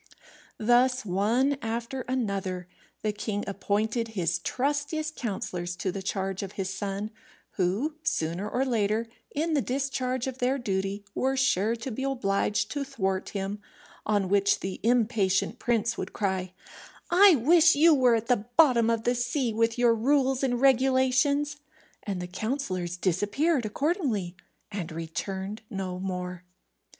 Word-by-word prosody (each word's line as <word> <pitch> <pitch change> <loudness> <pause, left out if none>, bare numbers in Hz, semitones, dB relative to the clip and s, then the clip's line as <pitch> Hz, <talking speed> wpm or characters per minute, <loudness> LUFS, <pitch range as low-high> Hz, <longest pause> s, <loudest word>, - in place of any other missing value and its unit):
Thus, 245 +2 +3
one 225 +9 +1
after 230 +3 -3
another, 195 -8 -2 0.4
the 215 - +1
king 205 0 -3
appointed 215 +3 -1
his 170 -1 +1
trustiest 290 - -2
counsellors 180 -6 -4
to 185 +1 -2
the 195 +1 -5
charge 190 0 -2
of 195 -1 -6
his 190 -1 -3
son, 200 +2 -4 0.4
who, 200 - 0
sooner 180 - -1
or 255 +4 0
later, 220 -2 +1 0.2
in 320 +2 -1
the 290 - +3
discharge 260 -1 -1
of 260 -1 -5
their 255 +2 +1
duty, 195 -3 -2
were 265 +1 0
sure 230 -5 +2
to 235 +3 -6
be 235 - -5
obliged 215 -6 0
to 285 -1 -2
thwart 195 -9 -2
him; 200 +1 -4 0.4
on 205 -2 +1
which 200 +1 +2
the 190 0 -4
impatient 225 -2 +1
prince 230 -1 0
would - - -5
cry, 190 -2 -2 0.6
"I 375 0 +8
wish 325 +6 +5
you 320 +3 +6
were 255 -4 +4
at 225 0 -1
the 230 -3 +1
bottom 250 -8 +5
of 230 -1 0
the 245 - +2
sea 245 0 -1
with 230 +2 +1
your 240 -1 +4
rules 265 +2 +2
and 245 -3 0
regulations;" 270 +2 +3 0.4
and 195 -3 -4
the 180 - -4
counsellors 185 -3 -3
disappeared 215 - +1
accordingly, 230 - -1 0.4
and 195 -6 -4
returned 190 +6 -5
no 190 -4 -4
more. 180 -1 -4
225 Hz, 145 wpm, -27 LUFS, 195-260 Hz, 0.6 s, I